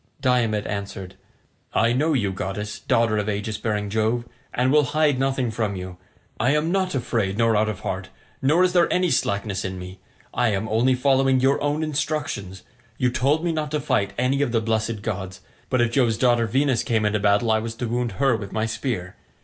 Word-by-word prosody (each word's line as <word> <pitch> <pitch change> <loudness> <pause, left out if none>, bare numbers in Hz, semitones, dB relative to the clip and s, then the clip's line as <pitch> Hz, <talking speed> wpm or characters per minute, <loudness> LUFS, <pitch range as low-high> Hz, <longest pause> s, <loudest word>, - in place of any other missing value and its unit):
Diomed 115 -5 +1
answered, 100 -2 -5 0.6
"I 115 +1 +3
know 155 +5 +1
you, 105 -8 +1
goddess, 100 +2 -4
daughter 115 -2 +1
of 105 0 -2
aegis 105 0 -3
bearing 105 -2 -1
Jove, 110 +2 0 0.3
and 125 +2 +1
will 150 -1 +5
hide 150 -4 +3
nothing 135 -3 0
from 110 -2 -2
you. 90 -1 -7 0.4
I 130 +6 +3
am 155 +3 +1
not 190 -3 0
afraid 110 -6 -1
nor 115 -1 +3
out 110 +1 +2
of 100 -3 -5
heart, 95 0 -4 0.3
nor 155 +7 +4
is 180 -1 +2
there 175 -2 +3
any 180 -2 +2
slackness 100 -4 0
in 95 0 -4
me. 90 +1 -9 0.3
I 120 0 +2
am 100 +3 -2
only 120 +4 +2
following 135 0 +3
your 135 +2 +2
own 145 +2 0
instructions; 145 - -3 0.3
you 125 -1 +1
told 145 +7 +1
me 170 - +1
not 155 -2 -2
to 150 +1 -1
fight 125 -9 0
any 130 +3 +1
of 140 -4 +1
the 115 - +2
blessed 110 -1 -1
gods; 95 -3 -4 0.3
but 130 -2 +2
if 120 -1 +2
Jove's 120 -3 +2
daughter 120 -2 +3
Venus 130 +1 +1
came 110 -2 0
into 105 0 +1
battle 105 +3 +2
I 110 - +3
was 115 +1 -5
to 120 - -3
wound 120 -1 -1
her 135 +3 +2
with 100 -3 -6
my 110 0 -1
spear. 110 -5 -4
115 Hz, 205 wpm, -23 LUFS, 105-135 Hz, 0.6 s, will